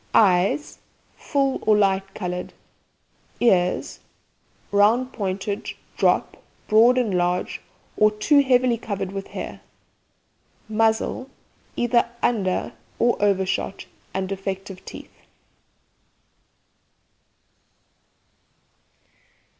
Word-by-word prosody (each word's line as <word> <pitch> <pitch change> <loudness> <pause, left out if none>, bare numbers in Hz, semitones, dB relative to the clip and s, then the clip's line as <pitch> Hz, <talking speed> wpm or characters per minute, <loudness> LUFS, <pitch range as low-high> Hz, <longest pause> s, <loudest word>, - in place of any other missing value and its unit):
EYES 195 +7 +3 0.4
Full 275 -2 0
or 215 -1 +3
light 195 -1 +1
coloured. 180 -2 -4 0.9
EARS 180 -6 +2 0.7
Round 225 +6 +3
pointed, 200 0 -3 0.3
drop, - - +1 0.3
broad 230 +4 +5
and 225 -7 +1
large, 180 0 -1 0.3
or 215 - +5
too 215 +8 +3
heavily 250 -3 +3
covered 195 -4 -4
with 195 0 -5
hair. - - -7 1.1
MUZZLE 220 +4 0 0.5
Either 240 0 +2
under 195 -6 0 0.2
or 240 0 +3
over 195 -2 +2
shot, 195 +1 -3 0.3
and 190 0 -2
defective 195 -1 -5
teeth. - - -10
205 Hz, 85 wpm, -23 LUFS, 190-235 Hz, 1.1 s, broad